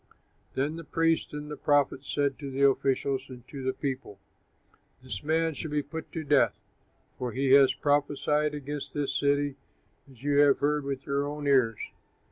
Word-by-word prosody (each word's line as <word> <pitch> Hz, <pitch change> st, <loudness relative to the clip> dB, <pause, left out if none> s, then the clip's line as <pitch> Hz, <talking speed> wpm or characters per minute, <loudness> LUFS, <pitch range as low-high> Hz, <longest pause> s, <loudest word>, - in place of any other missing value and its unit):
Then 145 Hz, +4 st, -1 dB
the 165 Hz, -, -7 dB
priests 165 Hz, +1 st, +1 dB
and 150 Hz, 0 st, -6 dB
the -, -, -4 dB
prophets 145 Hz, -2 st, +1 dB
said 140 Hz, -2 st, 0 dB
to 140 Hz, -2 st, -5 dB
the 140 Hz, +1 st, +4 dB
officials 135 Hz, 0 st, 0 dB
and 125 Hz, -2 st, -11 dB
to 140 Hz, -, -7 dB
the 130 Hz, 0 st, 0 dB
people, 130 Hz, -7 st, -5 dB, 0.9 s
"This 115 Hz, -8 st, -5 dB
man 160 Hz, +1 st, +1 dB
should 155 Hz, +2 st, -5 dB
be 150 Hz, 0 st, 0 dB
put 160 Hz, +3 st, -7 dB
to 160 Hz, -, -3 dB
death, 145 Hz, -1 st, +3 dB, 0.6 s
for 125 Hz, -2 st, -3 dB
he 135 Hz, 0 st, +1 dB
has 135 Hz, -1 st, +7 dB
prophesied 150 Hz, +1 st, +1 dB
against 145 Hz, 0 st, -6 dB
this 145 Hz, -1 st, -1 dB
city 145 Hz, -1 st, +1 dB, 0.5 s
as 130 Hz, -1 st, -17 dB
you 145 Hz, 0 st, +2 dB
have 145 Hz, -1 st, +6 dB
heard 150 Hz, 0 st, 0 dB
with 140 Hz, -1 st, -4 dB
your 140 Hz, +1 st, 0 dB
own 145 Hz, 0 st, -5 dB
ears." 130 Hz, -6 st, +2 dB
140 Hz, 175 wpm, -28 LUFS, 135-150 Hz, 0.9 s, has